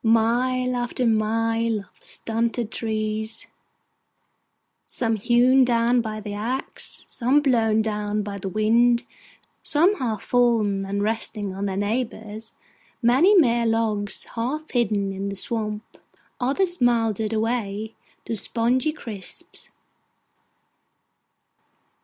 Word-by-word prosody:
Mile 245 +3 +2
after 245 +1 -1
mile 225 0 +1
of 195 - -19
stunted 230 0 -2
trees: 220 0 -3 1.4
some 225 -2 +2
hewn 245 +5 +4
down 240 0 +3
by 215 -1 -5
the 205 -1 -6
axe, 235 +6 -4
some 260 +4 +2
blown 225 -6 +2
down 210 -1 -2
by 200 -1 -6
the 195 - -4
wind, 235 +4 +3 0.6
some 345 +7 +3
half 225 - -2
fallen 220 -5 +2
and 200 +1 -1
resting 215 -2 -2
on 195 +1 -3
their 190 -1 -3
neighbours, 220 0 -3 0.5
many 275 - +5
mere 235 -7 +4
logs 220 -3 0
half 275 +7 -3
hidden 210 -5 +1
in 195 +1 -4
the 200 - -5
swamp, 215 0 -1 0.6
others 345 +6 0
mouldered 225 -3 +2
away 220 -1 -2 0.3
to 230 - -3
spongy 245 +7 +1
chips. 215 -10 -9
225 Hz, 110 wpm, -24 LUFS, 215-245 Hz, 1.4 s, many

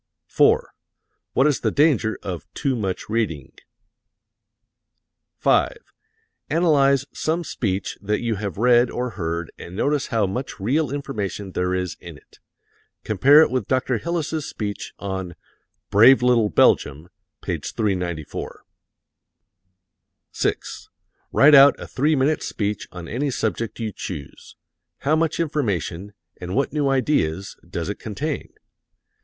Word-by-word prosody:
4. - - +3 0.6
What 135 - +3
is 145 -5 +2
the - - 0
danger 140 -8 +2
of 90 -5 -6
too 140 -3 0
much 95 -5 -3
reading? 100 - -2 1.8
5. - - +2 0.7
Analyze 140 -4 +3
some 165 +2 -1
speech 100 - -3
that 105 +1 -1
you 115 -1 -1
have 100 -3 -5
read 120 +2 +4
or 125 0 -3
heard 85 -4 -4
and 90 - -9
notice 145 +5 0
how 115 -5 +1
much 125 +8 -5
real 135 +9 +1
information 105 -9 -4
there 90 0 -1
is 90 -2 -3
in - - -10
it. - - -23 0.6
Compare 140 - +6
it - - -1
with 130 0 -1
Dr. 130 -2 0
Hillis's 160 -3 -2
speech 105 -2 -5
on 95 -3 -5 0.6
"Brave 120 +5 +7
Little 120 -4 +3
Belgium," 75 -1 +2 0.3
page 85 -6 -3
394. 90 -8 -3 1.7
6. - - -3 0.4
Write 150 +2 +6
out 140 0 +8
a - - -7
three 150 +4 +1
minute 145 +3 +1
speech 105 -1 -3
on 90 -2 -8
any 135 - -2
subject 115 -2 -3
you 110 -2 -3
choose. 80 -6 -8 0.5
How 145 +3 +2
much 160 0 0
information, 100 - -2 0.2
and 90 0 -5
what 140 +2 0
new 145 -2 +1
ideas, 105 - 0
does 85 -2 -4
it 100 - -4
contain? 140 +8 -4
115 Hz, 130 wpm, -22 LUFS, 95-140 Hz, 1.8 s, out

